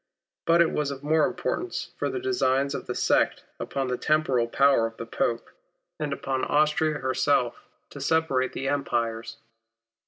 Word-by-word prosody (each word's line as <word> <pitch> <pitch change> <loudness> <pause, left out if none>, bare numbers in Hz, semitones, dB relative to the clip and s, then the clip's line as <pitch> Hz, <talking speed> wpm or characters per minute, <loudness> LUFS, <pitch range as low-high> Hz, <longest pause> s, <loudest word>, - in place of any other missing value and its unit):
But 170 +1 +5
it 165 - -1
was 150 -2 -1
of 140 -1 -7
more 155 +3 +3
importance 350 - -3
for - - 0
the 390 - -3
designs 140 - +1
of - - -5
the - - -3
sect - - +2 0.2
upon 135 -1 -2
the 125 -1 -2
temporal 140 -6 +2
power 135 -2 +3
of 115 - -12
the 115 - -6
Pope, 115 0 -2 0.5
and 150 -2 -2
upon 135 -1 -2
Austria 150 +1 +2
herself, 130 -2 +1 0.3
to 140 - -9
separate 140 -3 +1
the 135 - -3
Empires. 115 -5 -2
140 Hz, 160 wpm, -26 LUFS, 125-155 Hz, 0.5 s, But